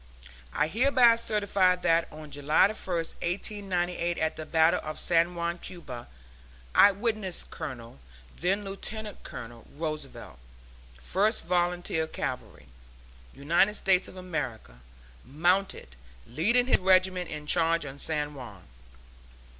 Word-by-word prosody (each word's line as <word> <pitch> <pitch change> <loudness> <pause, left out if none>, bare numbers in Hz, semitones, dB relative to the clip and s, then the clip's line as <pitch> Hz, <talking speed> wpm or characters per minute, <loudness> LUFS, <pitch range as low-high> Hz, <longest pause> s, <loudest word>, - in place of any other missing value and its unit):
I 150 - +1
hereby 240 - +4
certify 200 -5 +2
that 170 -2 +1
on 155 -1 -10
July 145 +2 +1
1, 215 - -5
1898, 175 0 -2
at 160 0 -1
the 155 - -7
battle 160 0 +3
of 155 0 -6
San 170 +1 +3
Juan, 170 0 -2
Cuba, 145 -11 -9 0.7
I 205 - +7
witnessed 205 -3 -3
Colonel 120 - -8 0.4
(then 195 +4 0
Lieutenant 210 +1 -6
Colonel) 115 0 -10
Roosevelt, 155 - -6 0.6
First 205 - 0
Volunteer 175 -2 0
Cavalry, - - -5 0.7
United 170 +9 +2
States 190 -2 +3
of - - -12
America, 130 - -5 0.4
mounted, 175 - 0 0.3
leading 220 - +2
his 255 - +3
regiment 185 -1 +3
in 150 -1 -6
the - - -16
charge 165 -2 +3
on 140 0 -9
San 150 -1 -1
Juan. 110 -10 -10
175 Hz, 120 wpm, -28 LUFS, 155-195 Hz, 0.7 s, I